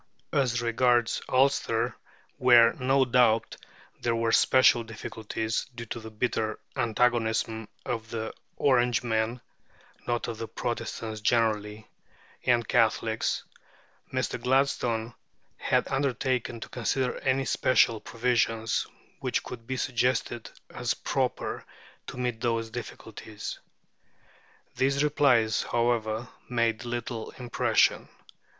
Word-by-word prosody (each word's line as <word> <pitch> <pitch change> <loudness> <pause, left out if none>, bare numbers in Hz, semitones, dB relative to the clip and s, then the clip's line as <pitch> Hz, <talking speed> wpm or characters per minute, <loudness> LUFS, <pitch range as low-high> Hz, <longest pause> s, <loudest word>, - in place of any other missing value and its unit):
As 120 -3 +1
regards 120 0 +2
Ulster, 125 -3 +2 0.4
where, 120 -2 +6
no 135 +1 +2
doubt, 120 -2 +3 0.4
there 120 -1 0
were 115 0 +1
special 130 -2 +5
difficulties, 110 0 -4
due 115 -1 -6
to 120 - -5
the 110 0 -9
bitter 110 -1 -1 0.2
antagonism 115 -2 +1 0.2
of 115 -2 -3
the 110 -1 -4 0.2
Orangemen 120 -3 +1 0.7
(not 120 -2 -1
of 115 -2 -5
the 115 - -4
Protestants 110 -1 -4
generally) 110 -1 0 0.6
and 120 -3 +2
Catholics, - - +1 0.7
Mr. 130 -2 -2
Gladstone 125 -3 +1 0.4
had - - +1
undertaken 130 -3 -1
to - - -7
consider 125 +1 -1
any 135 -1 +1
special 115 -4 +3
provisions 115 -1 0 0.3
which - - -1
could 115 -2 -9
be 130 0 -2
suggested 125 -2 0 0.2
as - - -1
proper - - -2 0.4
to - - -7
meet 125 -3 -2
those 115 -2 -1
difficulties. 110 -2 -7 1.2
These 140 +2 +2
replies, 130 -7 +3
however, 115 -1 0 0.2
made 115 0 0
little 120 -1 -4
impression. 120 -2 +2
120 Hz, 105 wpm, -28 LUFS, 110-125 Hz, 1.2 s, where